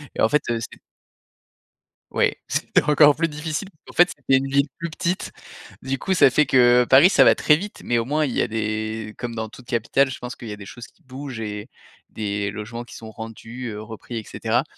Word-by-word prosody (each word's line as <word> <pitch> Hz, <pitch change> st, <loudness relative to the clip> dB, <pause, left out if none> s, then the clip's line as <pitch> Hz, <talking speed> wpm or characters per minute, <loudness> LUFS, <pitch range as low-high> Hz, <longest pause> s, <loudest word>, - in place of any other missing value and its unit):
Et -, -, -2 dB
en 110 Hz, -, +4 dB
fait, 150 Hz, -1 st, +3 dB
heu, 115 Hz, -1 st, 0 dB
c'é -, -, -8 dB, 1.3 s
oui, -, -, +2 dB, 0.2 s
c'était -, -, +1 dB
encore 150 Hz, -1 st, +6 dB
plus 165 Hz, +1 st, +1 dB
difficile. 155 Hz, +4 st, -4 dB, 0.2 s
En -, -, -11 dB
fait, 175 Hz, 0 st, +5 dB
c'était 135 Hz, -4 st, +1 dB
une 135 Hz, +1 st, -2 dB
ville 140 Hz, +1 st, +2 dB
plus 170 Hz, 0 st, -3 dB
petite, 180 Hz, +3 st, -3 dB, 0.5 s
du 135 Hz, 0 st, -2 dB
coup 190 Hz, -1 st, 0 dB
ça 135 Hz, -, +6 dB
fait 150 Hz, 0 st, +3 dB
que 125 Hz, -1 st, +5 dB
Paris, 140 Hz, +6 st, +8 dB
ça -, -, +6 dB
va -, -, +6 dB
très 150 Hz, -, +4 dB
vite 200 Hz, +6 st, -7 dB
mais, 120 Hz, -1 st, +1 dB
au 115 Hz, -, -2 dB
moins, 150 Hz, +3 st, +1 dB
il 130 Hz, -, -3 dB
y -, -, 0 dB
a -, -, +1 dB
des 110 Hz, 0 st, -3 dB
comme 120 Hz, -2 st, -5 dB
dans 110 Hz, 0 st, -3 dB
toute 120 Hz, +3 st, -15 dB
capitale, 125 Hz, +4 st, +1 dB
je 130 Hz, -, -6 dB
pense 125 Hz, 0 st, -7 dB
qu'il 120 Hz, -, -10 dB
y -, -, -5 dB
a -, -, -5 dB
des 100 Hz, -1 st, -11 dB
choses 115 Hz, +3 st, -10 dB
qui 175 Hz, -, -29 dB
bougent 130 Hz, -2 st, -8 dB
et 105 Hz, +2 st, -6 dB, 0.4 s
des 100 Hz, -1 st, -3 dB
logements 110 Hz, +3 st, -6 dB
qui 120 Hz, -, -13 dB
sont 110 Hz, -1 st, -9 dB
rendus, 115 Hz, +3 st, -8 dB
heu, 105 Hz, -1 st, -6 dB
repris, 110 Hz, +2 st, -8 dB
et 110 Hz, -, -4 dB
cetera. -, -, -1 dB
125 Hz, 230 wpm, -23 LUFS, 110-145 Hz, 1.3 s, Paris